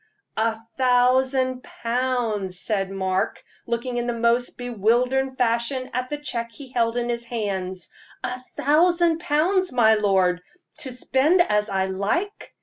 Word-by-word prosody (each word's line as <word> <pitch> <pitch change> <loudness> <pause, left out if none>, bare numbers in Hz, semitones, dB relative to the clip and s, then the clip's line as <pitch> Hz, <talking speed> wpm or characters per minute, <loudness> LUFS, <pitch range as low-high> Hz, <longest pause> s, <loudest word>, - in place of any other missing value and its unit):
"A 220 +1 +1 0.2
thousand 255 0 +3
pounds!" 230 -7 -2
said 195 -3 0
Mark, 190 -1 -2 0.2
looking 240 +1 -2
in 240 0 -1
the 240 - 0
most 235 +1 +1
bewildered 245 +3 0
fashion 245 +2 0
at 255 0 -2
the 295 - -3
check 240 -5 -3
he 270 +1 -11
held 230 -1 +1
in 240 0 -1
his 235 0 -2
hand 200 -6 -3 0.5
"a 250 0 -3 0.2
thousand 335 +3 +3
pounds, 360 +4 +1
my 225 -3 +5
lord, 190 -4 +2 0.4
to 260 - -4
spend 265 +7 +2
as 210 -6 0
I 190 -1 0
like! 205 - -2
245 Hz, 140 wpm, -23 LUFS, 215-260 Hz, 0.5 s, my